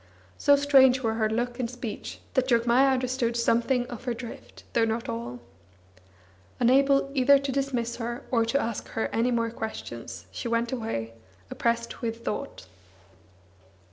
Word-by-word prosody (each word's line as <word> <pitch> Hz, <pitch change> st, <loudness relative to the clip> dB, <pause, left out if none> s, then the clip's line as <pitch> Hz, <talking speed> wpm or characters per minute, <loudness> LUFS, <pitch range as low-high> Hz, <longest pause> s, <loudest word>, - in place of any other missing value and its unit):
So 285 Hz, -1 st, +6 dB
strange 265 Hz, -2 st, +5 dB
were 225 Hz, -1 st, +1 dB
her 220 Hz, -1 st, +1 dB
look 240 Hz, +2 st, -2 dB
and 240 Hz, -2 st, -1 dB
speech 245 Hz, -3 st, -7 dB
that 260 Hz, 0 st, +2 dB
Jogmaya 240 Hz, +2 st, +4 dB
understood 255 Hz, -2 st, 0 dB
something 240 Hz, +2 st, +2 dB
of 245 Hz, 0 st, -9 dB
her 245 Hz, -2 st, -1 dB
drift, 235 Hz, 0 st, -10 dB
though 230 Hz, -, +3 dB
not 225 Hz, +1 st, -1 dB
all. 120 Hz, +2 st, -5 dB, 1.2 s
Unable 275 Hz, +3 st, +4 dB
either 280 Hz, +1 st, +6 dB
to 275 Hz, 0 st, -3 dB
dismiss 255 Hz, -3 st, -1 dB
her, 240 Hz, 0 st, -4 dB
or 230 Hz, -3 st, +3 dB
to 230 Hz, +5 st, +1 dB
ask 230 Hz, -4 st, -3 dB
her 225 Hz, -, 0 dB
any 230 Hz, +2 st, +2 dB
more 230 Hz, -2 st, 0 dB
questions, 120 Hz, -, -7 dB
she 235 Hz, -, -5 dB
went 235 Hz, 0 st, 0 dB
away, 220 Hz, -, -3 dB, 0.4 s
oppressed 235 Hz, 0 st, -1 dB
with 230 Hz, -1 st, -4 dB
thought. 95 Hz, -, -4 dB
235 Hz, 150 wpm, -27 LUFS, 230-260 Hz, 1.2 s, So